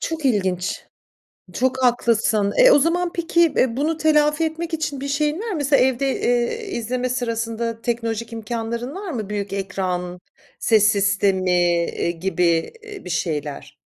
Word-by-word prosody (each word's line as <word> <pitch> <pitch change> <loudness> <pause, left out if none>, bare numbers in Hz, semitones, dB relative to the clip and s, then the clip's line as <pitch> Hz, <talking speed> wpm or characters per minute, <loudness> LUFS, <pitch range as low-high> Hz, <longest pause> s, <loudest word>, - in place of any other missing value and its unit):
Çok 320 -3 -4
ilginç! 185 -7 0 0.7
Çok 260 +5 0
haklısın. 220 -4 +2
E, - - +8
o - - +7
zaman 345 +3 +1
peki, 340 0 0 0.2
eee, 245 -2 +2
bunu 310 +3 0
telafi 300 0 +2
etmek 325 +1 -3
için 295 -3 -3
bir 280 - -4
şeyin 300 +3 0
var 460 - -5
mı? 355 - -2
Mesela 285 -2 +3
evde, 265 +1 +1
eee, 245 - 0
izleme 250 0 -2
sırasında 230 -2 -3
teknolojik 230 -1 -3
imkânların 235 +3 -4
var 390 -1 -6
mı? 215 -5 -5
Büyük 205 -1 -3
ekran, 180 -2 -3 0.4
ses 215 -3 +3
sistemi, 195 -2 +1
eee, 175 -1 +1
gibi, 170 -1 0
eee, 420 -2 -10
bir 180 - -7
şeyler. 150 -4 -3
235 Hz, 150 wpm, -21 LUFS, 195-295 Hz, 0.7 s, E